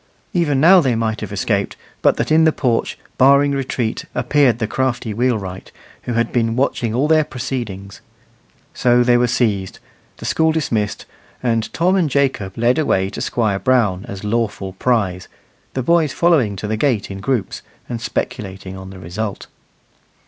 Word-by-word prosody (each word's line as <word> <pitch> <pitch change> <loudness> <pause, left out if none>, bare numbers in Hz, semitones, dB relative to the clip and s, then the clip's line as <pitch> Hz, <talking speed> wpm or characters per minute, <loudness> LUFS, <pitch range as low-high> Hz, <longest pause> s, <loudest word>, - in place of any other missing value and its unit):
Even 155 -6 +1
now 180 +5 +7
they 130 -6 +1
might 110 -1 -1
have - - -5
escaped, - - -1 0.3
but - - +3
that - - -2
in 160 +1 +5
the 160 - +5
porch, 125 -6 -1 0.2
barring 140 +2 +5
retreat, 130 -4 -2
appeared 140 -6 +3
the 115 - -1
crafty 125 -2 -2
wheelwright, 105 -6 -2 0.3
who 120 - -2
had 115 0 0
been 115 -2 +1
watching 125 -3 0
all 135 +5 +2
their 155 0 +4
proceedings. 120 -7 -6 0.7
So 120 0 +3
they 120 0 +4
were 120 0 +3
seized, 105 -6 0 0.4
the - - -9
school 160 0 +2
dismissed, 115 -10 -1 0.4
and 115 -2 0
Tom 180 +3 +2
and 175 -6 +2
Jacob 130 -9 0
led 120 +5 +2
away 95 -10 +1
to - - -6
Squire 110 -5 0
Brown 110 -8 +1
as 100 0 -7
lawful 105 -3 -2
prize, 95 -4 0 0.5
the 130 - -1
boys 160 0 +2
following 150 -12 +2
to 95 - -6
the 110 +1 -1
gate 110 -6 0
in 95 - -6
groups, 105 -1 -2 0.3
and 120 -2 -5
speculating 95 -4 -4
on 95 0 -9
the 95 - -10
result. 95 +4 -5
120 Hz, 165 wpm, -19 LUFS, 100-135 Hz, 0.7 s, now